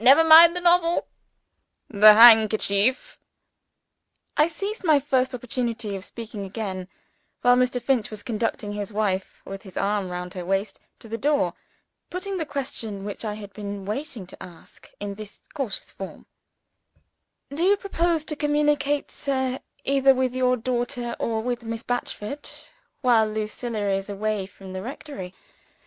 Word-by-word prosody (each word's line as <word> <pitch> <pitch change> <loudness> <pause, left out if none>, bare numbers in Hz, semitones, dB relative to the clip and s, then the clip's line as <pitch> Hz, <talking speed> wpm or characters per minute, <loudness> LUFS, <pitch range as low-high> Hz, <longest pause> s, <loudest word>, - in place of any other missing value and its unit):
Never 275 +6 +8
mind 325 +2 +9
the 355 - -2
novel 345 -1 +3 0.8
the 210 0 +8
handkerchief." 220 0 +5 1.2
I 300 - +4
seized 400 +6 -5
my 310 -5 +5
first 260 -2 0
opportunity 235 -4 -3
of 190 - -6
speaking 220 -1 -7
again, 190 -2 -5 0.6
while 245 0 +6
Mr. 250 0 +1
Finch 245 -2 0
was 215 -1 -7
conducting 225 -3 -2
his 205 0 -5
wife 200 -3 -2
(with 195 0 -7
his 190 -3 -12
arm 200 -1 0
round 180 0 -5
her 180 -2 -5
waist) 195 +2 -2 0.2
to - - -12
the 225 +1 -5
door 290 +2 +1 0.6
putting 375 +2 -4
the 320 -4 -3
question 230 -8 -4
which 205 +2 -6
I 210 -2 -3
had 205 -2 -10
been 200 -1 -6
waiting 235 - -4
to 180 - -13
ask, 175 -3 -13
in 205 0 -4
this 210 0 -10
cautious 270 -9 -4
form: 195 - -9 1.3
"Do 305 - -3
you 395 +3 +4
propose 340 -5 0
to 305 - -3
communicate, 295 -1 +1
sir, 265 -2 -2 0.2
either 270 -1 +4
with 255 -1 0
your 255 0 +2
daughter 240 0 -2
or 220 -1 -1
with 245 0 -2
Miss 230 0 -5
Batchford, 245 +2 -4 0.5
while 235 -4 +4
Lucilla 215 0 -3
is 195 +1 -2
away 205 -1 -2
from 190 -1 -12
the 185 - -4
rectory? 225 -6 -8
230 Hz, 150 wpm, -24 LUFS, 205-280 Hz, 1.3 s, mind